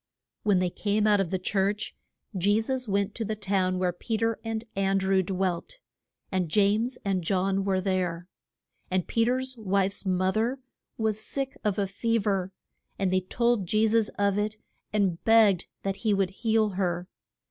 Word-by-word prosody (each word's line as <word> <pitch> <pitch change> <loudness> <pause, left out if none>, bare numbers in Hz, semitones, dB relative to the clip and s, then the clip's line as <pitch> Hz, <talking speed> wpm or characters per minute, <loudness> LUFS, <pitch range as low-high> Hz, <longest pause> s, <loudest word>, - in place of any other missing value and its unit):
When 205 -3 +3
they 180 -1 +1
came 210 +2 0
out 210 -1 +4
of 195 -4 0
the 190 - 0
church 200 +3 -1 0.4
Je 205 +4 +3
sus 255 +2 -2
went 200 0 0
to 230 - -3
the 215 0 -3
house 185 -2 +2
where 180 -1 0
Pe 220 +5 -3
ter 225 0 0
and 225 -1 -3
An 195 0 +2
drew 190 0 +2
dwelt. 185 - -2 0.5
And 185 -4 0
James 215 +7 +2
and 190 -3 0
John 195 +2 +1
were 190 -1 +1
there. 180 -2 -1 0.6
And 185 -1 0
Pe 230 0 +2
ter's 260 +1 -1
wife's 195 -1 +1
mo 185 -1 +1
ther 230 +6 0 0.4
was 215 -1 -1
sick 275 +2 -3
of 205 -3 0
a 200 - +1
fe 230 +4 0
ver, 195 -3 0 0.5
and 190 -2 0
they 185 - +3
told 235 +1 0
Je 215 +4 +3
sus 220 0 +3
of 200 0 +2
it 215 +1 -2 0.3
and 195 -5 0
begged 220 -5 +5 0.2
that 195 0 -2
he 215 -3 +1
would 195 -1 +1
heal 220 +1 +1
her. 180 -2 -2
200 Hz, 180 wpm, -27 LUFS, 185-220 Hz, 0.6 s, begged